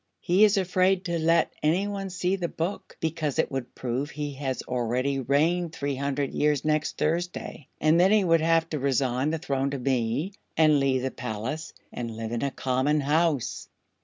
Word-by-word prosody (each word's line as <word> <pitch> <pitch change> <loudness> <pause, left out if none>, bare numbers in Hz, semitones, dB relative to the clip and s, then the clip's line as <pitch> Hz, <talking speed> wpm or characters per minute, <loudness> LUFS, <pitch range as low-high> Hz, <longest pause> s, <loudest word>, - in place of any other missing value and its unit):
"He 185 +4 +3
is 210 0 +3
afraid 185 0 +2
to 170 -2 -1
let 165 +1 +2
anyone 195 +5 0
see 180 +1 0
the 180 -3 -2
Book, 170 +4 -5
because 160 -3 -1
it 160 - +1
would 135 -2 -5
prove 130 +3 -2
he 150 -1 -4
has 135 -1 -3
already 125 +3 -1
reigned 160 +6 +1
three 140 -2 -2
hundred 140 0 -2
years 150 -2 +1
next 155 0 0
Thursday, 170 -3 -2
and 155 +2 +4
then 185 +2 +5
he 215 -2 +5
would 165 -2 +3
have 165 0 +3
to 150 - -2
resign 130 0 +1
the 165 - -1
throne 140 -4 -1
to 140 - -3
me 130 - -1 0.2
and 155 -2 +5
leave 130 -2 +1
the 130 - -1
Palace 125 +6 -5 0.2
and 115 -2 -5
live 115 0 -4
in 120 - -2
a 140 - +1
common 135 +3 0
house." 150 -2 0
150 Hz, 185 wpm, -26 LUFS, 130-165 Hz, 0.2 s, then